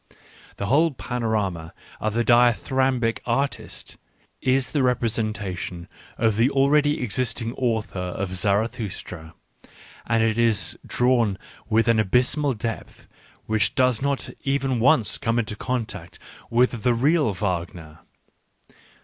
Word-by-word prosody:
The 100 - -3
whole 150 +9 +4
pano 120 -3 -3
rama 95 -7 -2 0.2
of 110 0 -2
the 120 0 +1
dithyrambic 120 0 +2
artist 135 +4 -3 0.4
is 130 0 +1
the 145 - +1
representation 105 -8 -1 0.3
of 110 -2 +1
the 120 +4 +4
already 145 +1 +2
existing 115 0 -2
author 110 -7 -2
of 90 +1 -4
Zarathustra, 100 -4 -2 0.7
and 115 0 +2
it 110 0 +1
is 115 -3 +2
drawn 120 -5 +2 0.3
with 115 +1 +3
an 115 -1 +4
abysmal 130 +7 +2
depth 115 +1 -6 0.4
which 110 -1 +1
does 125 -3 +2
not 140 -1 -1
even 135 -3 0
once 125 -2 +3
come 115 0 0
into 110 -2 -1
contact 110 -7 -4 0.3
with 120 -1 +2
the 120 0 +2
real 145 0 +2
Wagner. 85 -5 -4
115 Hz, 120 wpm, -24 LUFS, 105-130 Hz, 0.7 s, whole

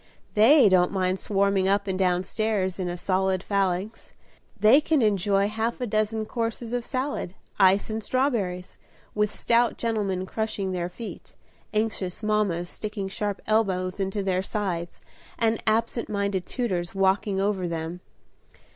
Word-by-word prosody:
They 235 +4 +7
don't 185 -2 +4
mind 185 -1 0
swarming 200 -1 +1
up 200 +1 +2
and 190 -1 -2
down 180 -1 +2
stairs 200 -3 -1
in 180 -1 -2
a 175 - -4
solid 190 0 0
phalanx; 195 +1 -2 0.4
they 235 +8 +6
can 300 -4 +2
enjoy 200 -1 +2
half 225 +2 -2
a 250 - -1
dozen 215 0 0
courses 230 +1 -3
of 245 -1 -1
salad, 255 -8 -3 0.2
ice 195 +1 +5
and 220 0 -3
strawberries, 205 -10 -1 0.3
with 210 0 +1
stout 235 0 +2
gentlemen 205 -5 -1
crushing 200 -1 -3
their 175 -1 -2
feet, 225 +5 -9 0.4
anxious 215 -3 -2
mammas 210 -5 0
sticking 210 0 -4
sharp 205 0 -3
elbows 190 -4 0
into 195 +1 -1
their 185 -1 +1
sides, 185 -4 -3 0.4
and 225 -1 +1
absent 230 +2 0
minded 200 -3 -1
tutors 185 -8 -2
walking 195 +1 +1
over 195 -2 0
them. 165 +1 -4
200 Hz, 145 wpm, -26 LUFS, 185-220 Hz, 0.4 s, They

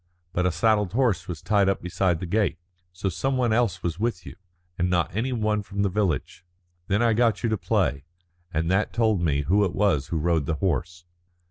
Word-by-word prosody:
But 90 +1 +1
a - - +1
saddled 105 +1 +1
horse 110 -8 +1
was 85 -4 -6
tied 100 -2 +3
up 100 - 0
beside 90 -1 0
the 90 - -4
gate. 100 -1 0 0.3
So 90 +3 -4
some 115 +9 -1
one 120 -3 +2
else 110 -6 +1
was 85 +1 -2
with 110 -5 -2
you, - - -9 0.4
and 90 0 0
not 90 -1 0
any 120 +5 -1
one 105 -3 0
from 100 0 -3
the 100 - +2
village. 90 -4 -2 0.4
Then 105 +4 +2
I 115 -1 +3
got 115 -1 +2
you 115 - +1
to 110 - +1
play, 70 -4 0 0.5
and 80 +1 -1
that 95 +3 +1
told 110 -5 +2
me 75 -4 +1
who 100 +8 +3
it 95 - -1
was 95 -9 +1
who 85 - -2
rode 80 -2 +1
the 80 - 0
horse." 85 0 -2
95 Hz, 215 wpm, -25 LUFS, 85-110 Hz, 0.5 s, tied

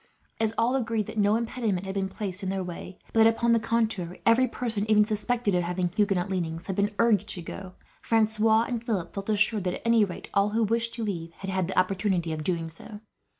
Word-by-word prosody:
As 220 -1 +1
all 240 +3 +2
agreed 225 -4 0
that 220 - -5
no 205 +1 +4
impediment 225 -5 -1
had 190 - -4
been 195 -1 -1
placed 190 -1 -4
in 190 - -3
their 190 0 -2
way, 180 +1 -8 0.2
but 225 - +2
that 225 - +7
upon 235 +1 +1
the 230 - +4
contrary, 220 -6 -1
every 235 +3 +5
person 225 -3 -3
even 210 -1 +5
suspected 215 0 -1
as 180 -1 +2
having 180 +1 -1
Huguenot 195 -4 +1
leanings 165 -3 -3
had 190 - -3
been 205 +1 0
urged 230 -5 +3
to 175 - -3
go, 185 +2 -8 0.3
Francois 220 0 +3
and 235 -1 -3
Philip 200 -8 -2
felt 195 +1 -5
assured 210 -1 +2
that, 180 - 0
at - - -8
any 230 -1 +5
rate, 185 -4 -5
all 200 0 +3
who 225 +2 +1
wished 230 +2 0
to 230 - -4
leave 170 -5 -4
had 195 +2 -6
had 190 -2 0
the 190 - -5
opportunity 185 -3 +1
of 155 -1 -4
doing 165 -1 -1
so. 205 +6 -10
205 Hz, 230 wpm, -27 LUFS, 185-225 Hz, 0.3 s, that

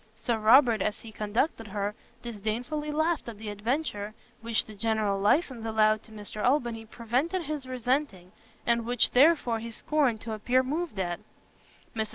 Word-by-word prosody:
Sir 225 +1 -1
Robert, 230 +1 +6
as 210 - -1
he 225 - -10
conducted 220 +3 -1
her, 205 0 -2 0.3
disdainfully 240 +7 -3
laughed 315 -2 0
at 225 - -9
the 215 0 -6
adventure, 210 -1 -2 0.3
which 230 -1 0
the 215 - -11
general 215 -2 0
licence 245 - +2
allowed 215 -1 +3
to 220 - -16
Mr 210 0 -6
Albany 240 -4 +1
prevented 255 - -1
his 295 -4 -4
resenting, 250 -7 -1 0.3
and 235 -1 +2
which 245 -1 +4
therefore 255 -4 +4
he 230 +1 -6
scorned 255 0 +1
to 225 - -5
appear 245 +4 +2
moved 300 - -3
at. 175 -2 -2 0.8
Mrs. 220 -1 -1
230 Hz, 160 wpm, -28 LUFS, 215-260 Hz, 0.8 s, Robert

